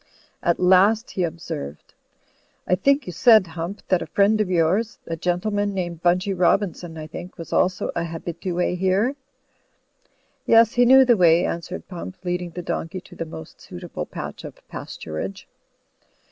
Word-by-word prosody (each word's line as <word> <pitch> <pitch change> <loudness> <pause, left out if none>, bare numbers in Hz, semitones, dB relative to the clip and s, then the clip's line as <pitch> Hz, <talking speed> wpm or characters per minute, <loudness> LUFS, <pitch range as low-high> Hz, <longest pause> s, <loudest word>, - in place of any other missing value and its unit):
At 170 - +1
last 195 +5 +4
he 185 - -3
observed, 155 - -6 0.7
"I - - +1
think 275 +10 +2
you 180 - -6
said, 220 +2 +6
Hump, 170 +3 -6
that 185 -2 +3
a - - -5
friend 210 +2 +3
of 205 - -1
yours 185 +6 +1
— - - -44
sl 165 - -3
gentleman 200 +4 -1
named 175 -3 -4
Bunchy 180 +3 +2
Robin 185 +1 +2
son, 165 -2 -10
I 155 - -6
think 175 +3 -9
— - - -41
^was 165 - -8
also 185 0 +1
a 170 - -1
habitue 170 +2 -3
here." 190 +8 +1 1.3
"Yes, 230 -1 +6
he 245 0 +4
knew 265 +2 +7
the 240 -3 +4
way," 170 -1 +5
answered 170 +2 -5
Pump, 185 +1 -8
leading 180 0 -2
the 175 +1 -7
dorJcey 180 +2 -4
to - - -15
the 165 - -4
most 80 - -11
suitable - - -7
patch - - -7
of - - -9
pasturage. 80 +5 -6
180 Hz, 170 wpm, -23 LUFS, 170-205 Hz, 1.3 s, knew